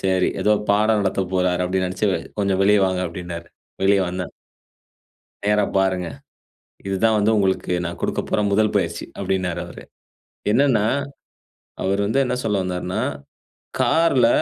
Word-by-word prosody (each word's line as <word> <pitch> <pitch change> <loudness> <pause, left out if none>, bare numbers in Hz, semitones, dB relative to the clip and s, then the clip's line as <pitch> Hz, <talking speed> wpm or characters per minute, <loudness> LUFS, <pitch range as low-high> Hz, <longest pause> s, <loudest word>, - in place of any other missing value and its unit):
சரி 95 -1 +2
எதோ 105 - +4 0.2
பாடம் 110 +1 +3
நடத்த 95 0 0
போறார், 90 -1 +1
அப்படினு 95 0 0
நெனச்சு 95 +3 -1 0.3
கொஞ்சம் 95 -1 +1
வெளிய 105 +1 +5
வாங்க 95 -1 -1
அப்படினாரு. 85 0 -7 0.4
வெளிய 100 +1 +4
வந்தேன். 90 0 -5 1.1
"நேரா 105 0 +3
பாருங்க. 95 -2 +1 0.8
இதுதான் 110 +3 +2
வந்து 105 +2 +3
உங்களுக்கு 95 -2 +1
நான் 85 0 -5
குடுக்க - - -1
போற - - +2
1 110 +1 +3
பயிற்சி!" - - -1
அப்படின்னாரு 90 -2 -1
அவரு. - - -11 0.7
என்னன்னா, 120 -4 +3 1.0
அவர் 95 +1 0
வந்து 110 +6 0
என்ன 125 - -1
சொல்ல 105 -2 +1
வந்தார்னா, 90 +2 -3 0.8
"கார்ல 160 -7 +4
95 Hz, 135 wpm, -22 LUFS, 90-105 Hz, 1.1 s, வெளிய